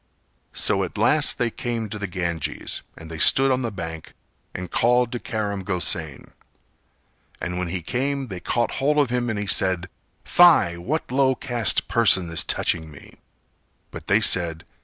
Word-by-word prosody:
So - - +1
at - - -6
last - - +2
they 120 -1 -1
came 115 -2 -4
to 105 - -6
the 100 - -4
Ganges 85 -3 -4 0.2
and 80 0 -11
they 80 - -7
stood 135 +10 +6
on 130 0 0
the 120 -3 -3
bank 80 -4 -8 0.4
and 90 -1 -7
called 125 0 +2
to 120 - -4
Karam 100 -4 -4
Gosain; 85 -6 -2 1.1
and 90 0 -4
when 90 - -2
he 85 0 -5
came 135 - -2
they 95 -3 -6
caught 120 +6 -1
hold 150 +2 +1
of 140 -5 +2
him 120 -1 -1
and 110 - -3
he 105 - -3
said 95 -2 0 0.3
"Fie, 170 - +5
what 130 - -4
low 130 0 +2
caste 120 -5 +1
person 95 -7 +3
is 80 - +1
touching 80 -1 -1
me?" 75 - -15 0.7
But - - -10
they - - +3
said. 85 -3 +2
100 Hz, 170 wpm, -22 LUFS, 85-125 Hz, 1.1 s, stood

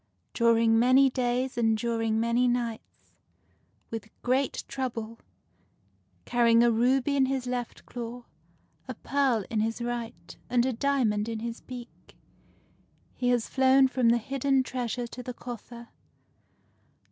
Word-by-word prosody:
During 230 -1 +3
many 260 +3 +5
days 250 0 -1
and 225 -1 +2
during 225 -1 -1
many 235 +2 +2
nights, 240 -2 -4 0.8
with 225 -2 -6
great 260 +2 0
trouble, 230 -4 -5 0.5
— - - -40
carrying 235 -1 +4
a 240 - +4
ruby 255 +5 +2
in 270 -1 +3
his 265 -1 -2
left 245 -1 -5
claw, 240 0 -7 0.6
a - - -5
pearl 265 -7 0
in 220 - 0
his 225 +2 -1
right, 240 -1 -5
and 245 -1 +2
a 260 - 0
diamond 230 -5 0
in 225 - -3
his 235 0 -5
beak, 245 -2 -11 0.5
— - - -37
he 250 - 0
has 245 -2 +1
flown 265 0 +4
from 255 -3 +2
the 235 - +4
hid 265 +4 -5
den 270 -1 +3
treasure 245 -1 -3
to 240 +1 -8
the 250 0 -7
coffer. 240 -1 -9
240 Hz, 145 wpm, -28 LUFS, 230-255 Hz, 0.8 s, many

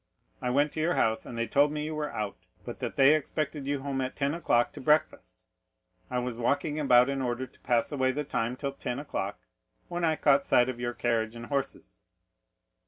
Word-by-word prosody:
I 125 - -1
went 145 +4 +2
to - - -5
your 170 +3 +1
house, 110 0 +1
and 120 - -7
they 115 - 0
told 145 +5 +3
me 150 0 -3
you 155 - -4
were 150 -1 -3
out, 105 -3 -3 0.3
but - - -7
that - - -4
they 135 +2 +6
expected 155 -1 -2
you 140 -1 -1
home 135 -1 -2
at 130 0 -3
ten 140 0 0
o'clock 135 -8 +1
to - - -9
breakfast. 130 - 0 0.7
I 125 - -2
was 125 -1 -3
walking 145 +5 0
about 125 -4 +5
in 140 -1 -1
order 125 0 -2
to 125 - -22
pass 120 +1 +1
away 130 -2 +1
the 150 +3 -2
time 125 -3 -2
till 140 +1 -4
ten 125 -2 -4
o'clock, 105 -8 -4 0.5
when 175 0 -3
I 160 -1 +3
caught 140 -2 +4
sight 125 +1 +4
of 125 -2 -5
your 120 0 -2
carriage 115 -1 0
and 115 0 -7
horses." 135 -7 -4
135 Hz, 215 wpm, -29 LUFS, 120-150 Hz, 0.7 s, they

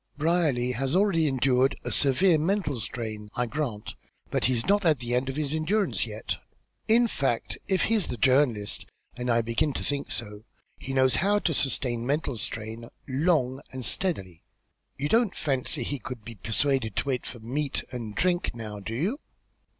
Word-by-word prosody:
Brierly 150 -6 +2
has 130 +5 -1
already 185 -5 +3
endured 130 -1 +2
a - - -3
severe 155 +5 +3
mental 160 - 0
strain, 110 0 -4
I 125 - +1
grant, 120 -5 -3 0.4
but - - +1
he's 120 -2 +2
not 205 +1 +3
at 160 -4 +4
the 120 0 -3
end 125 +2 +1
of 135 - -3
his 150 -1 -1
endurance 190 +7 +1
yet. - - -4 0.5
In 235 +2 +5
fact, 135 - -1
if 190 -1 +2
he's 220 -4 +2
the 125 - -4
journalist, 130 -4 +2 0.3
and 125 0 -3
I 115 -1 +3
begin 115 +6 +1
to - - -3
think 145 -1 -1
so, 105 -2 -4 0.4
he 135 - -6
knows 130 -2 +3
how 205 +2 +3
to 175 -5 +1
sustain 125 -4 0
mental 140 +1 0
strain 110 +2 -5 0.2
long 135 -2 +1
and 130 -2 -3
steadily. 95 - 0 0.6
You 145 - -1
don't 225 +1 +3
fancy 135 -2 0
he 140 +3 -2
could 120 -5 -7
be 115 - -7
persuaded 115 +2 0
to - - -1
wait 125 -2 -1
for 120 - -7
meat 135 +5 -2
and 115 -4 -5
drink 175 -7 +1
now, 110 -3 -6
do 110 +3 -5
you?" 195 - -1
130 Hz, 175 wpm, -27 LUFS, 115-155 Hz, 0.6 s, In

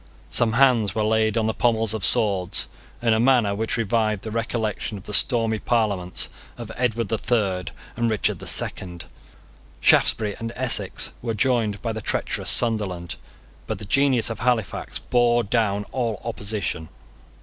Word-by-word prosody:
Some 115 -2 +2
hands 120 -5 +3
were 110 - 0
laid 110 0 +1
on 110 - +1
the 110 - 0
pommels 115 -3 +1
of 110 -4 -4
swords 100 -6 +2 0.4
in 115 -2 +3
a 110 - +2
manner 120 -4 +3
which 110 +2 -1
revived 110 -2 0
the 110 - -5
recollection 110 -2 -3
of 95 - -11
the 105 - -7
stormy 115 -1 +3
Parliaments 100 -7 -1 0.3
of 115 -2 -8
Edward 115 -2 -1
the 110 - -1
Third 95 -8 -1 0.3
and 115 -1 0
Richard 110 -2 0
the - - -7
Second. 85 -3 -1 0.7
Shaftesbury 105 -2 +3
and 115 0 -4
Essex 130 -1 +1
were 115 -2 -3
joined 110 -3 0
by 115 -2 -2
the 110 - -5
treacherous - - -1
Sunderland. 100 -8 +1 0.5
But - - -3
the 105 - -7
genius 130 0 +2
of 115 - -6
Halifax 115 -4 -1
bore 120 -1 +2
down 105 -2 0
all 115 -6 -2
opposition. 100 -8 -3
110 Hz, 160 wpm, -23 LUFS, 105-120 Hz, 0.7 s, hands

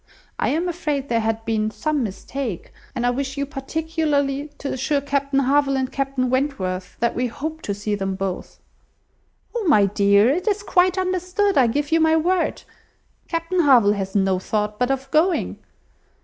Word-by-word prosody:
I - - +1
am 325 +6 0
afraid 300 -5 -2
there 230 -1 +2
had 225 0 -2
been 215 -1 0
some 300 +5 -1
mistake; 220 0 -5 0.2
and 245 - -1
I 245 - +3
wish 270 +2 -3
you 280 - 0
particularly 290 -1 -1
to 280 - -4
assure 280 +3 0
Captain 280 0 -1
Harville 275 +1 +2
and 260 -1 -2
Captain 270 -2 -1
Wentworth, 190 -10 -2
that 235 - +2
we 250 +1 -1
hope 310 +6 -5
to 200 - -3
see 205 +1 -3
them 195 -1 -2
both." 190 -1 -5 1.0
"Oh! 470 - -1
my 210 -10 +5
dear, 200 +2 +4
it 355 +8 -2
is 410 -1 +1
quite 365 -1 +3
understood, 370 +2 0
I 260 -3 +5
give 290 +6 -1
you 330 - +4
my 320 0 +4
word. 355 +2 0 0.6
Captain 335 +2 -1
Harville 250 -10 +5
has 195 -1 -4
no 190 -2 +2
thought 210 +2 -2
but 250 +1 +1
of 270 0 -2
going." 330 +4 +1
275 Hz, 175 wpm, -22 LUFS, 220-315 Hz, 1.0 s, my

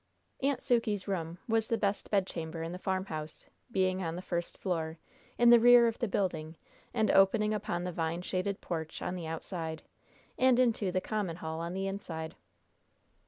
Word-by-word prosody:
"Aunt 275 0 +1
Sukey's 225 -5 +1
room" 170 -3 -2
was 225 -1 +2
the 230 - +1
best 200 -1 -1
bedchamber 165 -5 -1
in 165 - -4
the 180 - -6
farmhouse, 185 -5 -3 0.3
being 185 -2 +1
on 165 -2 -2
the 180 - -6
first 175 -2 -3
floor, 165 -3 -2 0.4
in 240 0 +7
the 240 - +9
rear 240 +1 +8
of 230 -1 0
the 235 - 0
building, 170 -5 -1 0.4
and 220 -2 +2
opening 210 +2 +4
upon 175 -4 -2
the 180 - -2
vine 165 +1 -2
shaded 190 +2 -2
porch 160 -2 -4
on - - -2
the 175 -3 -5
outside, 160 0 -4 0.6
and 255 -1 +5
into 230 -6 +2
the 185 +1 0
common 205 -6 -2
hall 160 -1 -5
on 170 +2 -4
the 195 0 -1
inside. 165 -5 -4
185 Hz, 175 wpm, -31 LUFS, 165-215 Hz, 0.6 s, the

